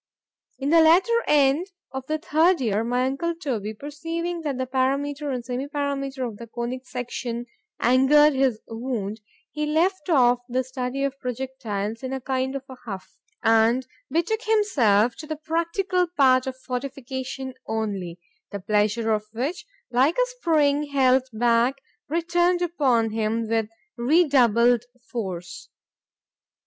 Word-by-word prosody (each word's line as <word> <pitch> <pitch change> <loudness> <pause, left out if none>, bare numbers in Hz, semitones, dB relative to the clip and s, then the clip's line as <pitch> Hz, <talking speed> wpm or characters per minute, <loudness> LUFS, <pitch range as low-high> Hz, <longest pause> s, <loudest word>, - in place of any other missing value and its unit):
In 280 +2 -1
the 330 0 +7
latter 370 +9 +5
end 290 +4 +3 0.2
of 265 0 -6
the 310 - 0
third 330 +3 +3
year, 220 -4 0
my 245 +2 +1
uncle 330 +6 -1
Toby 225 - -3
perceiving 330 +6 -4
that 290 -5 -3
the 260 - -1
parameter 275 +3 -1
and 250 -2 -4
semi 255 +2 -3
parameter 275 -2 -2
of 215 -3 -8
the 235 - -9
conic 240 +3 -5
section 245 -1 -4 0.3
angered 270 +5 +5
his 265 -4 +1
wound, 225 -3 -4 0.3
he 300 0 -2
left 335 +2 +1
off 250 -6 +4
the 255 +1 0
study 260 +1 -3
of 275 0 -2
projectiles 235 -5 -4
in 260 0 -4
a 265 - -2
kind 260 +1 -2
of 275 - -4
a 260 - -10
huff, 195 -5 -8 0.2
and 225 +3 +4 0.2
betook 340 - 0
himself 250 - +3
to 310 - -8
the 310 - -3
practical 335 +4 0
part 265 -6 +3
of 260 0 -4
fortification 260 0 -5
only; 200 -6 -3 0.3
the 200 - -5
pleasure 210 +3 +1
of 215 -1 0
which, 275 - -3 0.2
like 260 +7 +3
a - - +2
spring 295 -5 +2
held 260 -2 +3
back, 235 +3 +2 0.3
returned 345 +2 +1
upon 260 -10 +1
him 225 +1 -1
with 225 -1 0 0.3
redoubled 245 -4 +4 0.3
force. 185 -7 -5
260 Hz, 140 wpm, -24 LUFS, 235-300 Hz, 0.3 s, the